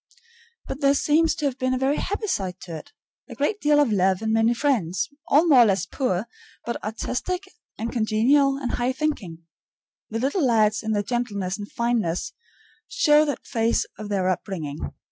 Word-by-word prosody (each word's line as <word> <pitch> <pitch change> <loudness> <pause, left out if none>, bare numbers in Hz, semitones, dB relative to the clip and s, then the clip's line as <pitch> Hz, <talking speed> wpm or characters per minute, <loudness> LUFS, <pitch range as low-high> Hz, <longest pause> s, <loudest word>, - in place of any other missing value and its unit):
But 270 +3 -6
there 280 0 +4
seems 310 +3 +2
to 300 - -3
have 270 -2 -2
been 255 0 +1
a - - -1
very 270 +3 +1
happy 410 +3 -2
side 195 - -2
to 170 -3 -7
it 155 - -10 0.4
a - - -8
great 395 +9 -1
deal 295 0 +4
of 285 -6 +3
love 190 0 +2
and 220 0 0
many 225 +1 +3
friends, 210 - 0 0.2
all 300 +4 +4
more 290 -7 +6
or 240 - +8
less 195 -3 +1
poor, 215 -7 -1 0.4
but 235 - -4
artistic 255 - -3 0.3
and 230 +2 -3
congenial 255 +5 +2
and 265 -3 -3
high 245 +2 0
thinking. 210 - -3 0.7
The 225 - -3
little 280 - 0
lads, 220 -4 +3
in 220 0 -2
their 205 -1 0
gentleness 205 -4 -2
and 205 - -8
fineness, 230 -8 -1 0.5
show 310 -12 +4
that 290 - -4
phase 230 -2 +1
of 210 -1 -6
their 190 -3 0
upbringing. 170 -5 -3
235 Hz, 185 wpm, -24 LUFS, 205-280 Hz, 0.7 s, or